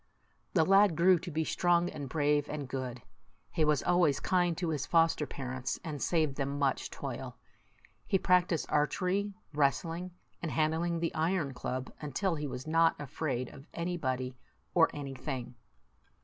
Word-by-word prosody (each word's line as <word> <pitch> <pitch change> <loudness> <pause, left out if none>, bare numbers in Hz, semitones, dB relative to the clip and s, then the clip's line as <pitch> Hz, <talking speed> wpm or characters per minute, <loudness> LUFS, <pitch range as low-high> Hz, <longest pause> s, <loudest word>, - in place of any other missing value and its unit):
The 160 -3 +5
lad 195 -1 +5
grew 175 +2 +5
to 175 - -7
be 160 0 0
strong, 175 +2 +2
and 140 -3 -6
brave, 145 0 +1
and 145 -3 -4
good. 125 -2 -5 0.5
He 160 - +1
was 150 -2 +2
always 175 -6 +3
kind 175 -3 +1
to 175 -2 -1
his 150 -4 -2
foster 165 -3 +3
parents, 130 0 -4
and 150 -5 -5
saved 155 -5 +1
them 140 0 -1
much 140 -2 0
toil. - - -6 0.7
He 195 - +3
practised 180 -3 +2
archery, 185 +7 +1 0.2
wrestling, 165 +5 0 0.3
and 170 - -2
handling 165 +2 +1
the 165 - -1
iron 160 -3 0
club, 130 0 -4
until 160 +6 -1
he 150 -2 -3
was 130 -1 -6
not 165 +1 +3
afraid 130 -3 -3
of 140 +3 -13
anybody 130 -7 -2 0.4
or 165 -2 +5
anything. 135 -3 -5
155 Hz, 150 wpm, -31 LUFS, 140-170 Hz, 0.7 s, The